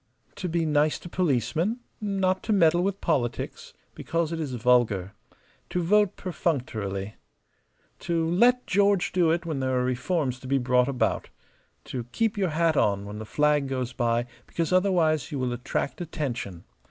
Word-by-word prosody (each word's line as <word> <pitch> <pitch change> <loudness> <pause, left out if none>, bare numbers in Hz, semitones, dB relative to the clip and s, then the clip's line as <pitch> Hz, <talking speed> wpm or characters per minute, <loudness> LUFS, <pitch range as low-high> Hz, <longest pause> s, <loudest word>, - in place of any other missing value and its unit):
"To 180 - -3
be 165 0 0
nice 150 0 +2
to 175 - -10
policemen. 165 - 0 0.2
Not 190 -2 0
to 220 - -1
meddle 175 -3 +4
with 195 +1 -1
politics, 125 -8 -2 0.2
because 165 -1 -2
it 165 - -3
is 140 -5 -3
vulgar. 110 -6 +2 0.6
To 180 - -1
vote 205 +2 +3
perfunctorily. 110 - -3 0.8
To 165 -1 0
'let 240 +9 +3
George 200 -1 +2
do 175 -3 +3
it' 170 +1 0
when 155 -4 -2
there 130 -1 0
are 125 - +1
reforms 130 +1 -1
to 130 - -10
be 135 +1 +2
brought 125 -1 +2
about. 125 -5 0 0.5
To 125 -3 -5
keep 220 - -1
your 195 -3 0
hat 160 0 +2
on 100 -6 +2
when 105 +1 -7
the 110 - -6
flag 150 +2 +2
goes 130 -2 -3
by 120 0 +1 0.2
because 165 +1 -2
otherwise 175 -5 +2
you 145 - -3
will 125 -2 -1
attract 125 +6 -3
attention. 125 - -4
155 Hz, 165 wpm, -26 LUFS, 125-180 Hz, 0.8 s, meddle